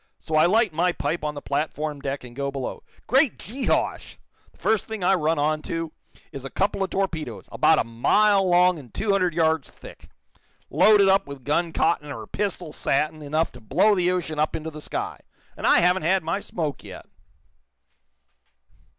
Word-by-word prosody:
So 160 - -8
I 155 +2 +5
light 215 -1 +2
my 175 +3 +2
pipe 170 -2 -3
on 150 0 -2
the 145 - -8
platform 150 +1 -2
deck 140 -1 -4
and 120 -1 -11
go 140 +1 -2
below. 135 -2 -5 0.2
Great 265 0 +3
Jehosh! 255 +6 -2 0.4
The - - -27
first 220 -2 0
thing 220 -4 -5
I 185 - +4
run 165 -3 +1
on 155 +1 0
to 165 -1 -3 0.4
is 140 -4 -8
a 135 - -6
couple 200 +4 -1
of 190 - 0
torpedoes, 160 - -3
about - - +4
a - - +2
mile 195 - +3
long 180 -1 +4
and 125 -6 -14
two 210 -1 -1
hundred 185 -4 +1
yards 160 -3 +1
thick, - - -14 0.6
loaded 210 -2 +5
up 195 -3 +3
with 140 -2 -9
gun 165 +5 0
cotton 155 -2 0
or - - -7
pistol 185 -6 -4
satin 155 +3 -1
enough 155 +3 -1
to 125 - -14
blow 180 - +3
the 180 -2 +2
ocean 165 -4 -2
up 155 - +1
into 160 0 -5
the 155 0 -9
sky. - - -4 0.4
And - - -2
I - - +6
haven't 180 +2 +3
had 185 +3 +1
my 165 +5 -1
smoke 155 -7 -4
yet!" - - -10
165 Hz, 185 wpm, -24 LUFS, 150-190 Hz, 0.6 s, I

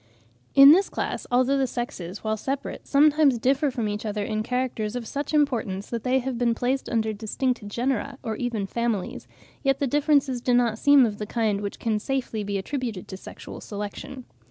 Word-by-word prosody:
In 275 +1 +10
this 380 +5 +4
class, - - -3
although 255 +3 +3
the 265 - +2
sexes, 210 -7 -5
when 215 0 0
separate, 270 +6 -5
sometimes 290 -2 +4
differ 270 +5 +2
from 235 -4 -2
each 210 0 -3
other 210 -1 -2
in 215 0 -2
characters 245 -2 -2
of 245 -2 -4
such 285 +4 -4
importance 235 -10 0
that 235 -2 -3
they 255 +1 +2
have 260 -2 -2
been 235 -1 +2
placed 255 +3 -1
under 220 -2 0
distinct 220 +2 -2
genera 250 +4 -2
or 225 -3 -3
even 230 -4 -2
families, 230 -2 -3 0.3
yet 270 -1 +2
the 280 - 0
differences 280 -2 +2
do 245 0 +2
not 235 -2 +2
seem 285 -2 +6
of 210 -2 -3
the 210 - -4
kind 215 -3 0
which 200 -1 -4
can 220 -2 0
be - - -3
safely 215 -5 -2
attributed 230 -2 -4
to 190 - -6
sexual 190 - -10
selection. 210 +5 -7
240 Hz, 190 wpm, -25 LUFS, 215-270 Hz, 0.3 s, In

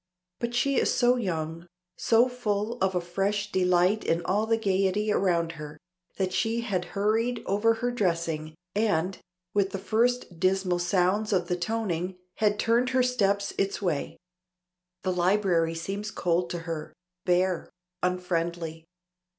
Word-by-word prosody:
But 235 0 -2
she 275 +2 +2
is - - +2
so 245 +1 +4
young, 170 -6 -3 0.3
so 230 +2 +4
full 230 -2 -2
of 190 -1 +1
a 180 - +1
fresh 195 +4 -1
delight 180 +2 +3
in 165 +1 0
all 210 +4 +1
the 225 0 +3
gaiety 200 0 +1
around 170 -5 +1
her, 150 0 -8 0.4
that 185 -1 -1
she 230 +1 0
had 195 -6 -1
hurried 225 +4 +1
over 215 +4 +2
her 245 - +1
dressing, 165 -7 -1 0.2
and, 195 -4 0 0.3
with 200 -2 +2
the 195 - -4
first 225 -2 0
dismal 185 -1 +2
sounds 185 +4 +1
of 180 -3 +1
the 180 - +2
toning, 180 -2 -2 0.2
had 210 -1 +2
turned 235 +3 +2
her 260 0 +3
steps 200 -5 +1
its 195 0 0
way. 170 -8 -2 0.9
The 185 - 0
library 180 -2 +2
seems 200 +5 -4
cold 175 -2 0
to 175 - -3
her, 165 -3 -5 0.3
bare, 180 0 +2 0.3
unfriendly. 170 -3 -2
190 Hz, 145 wpm, -27 LUFS, 175-215 Hz, 0.9 s, so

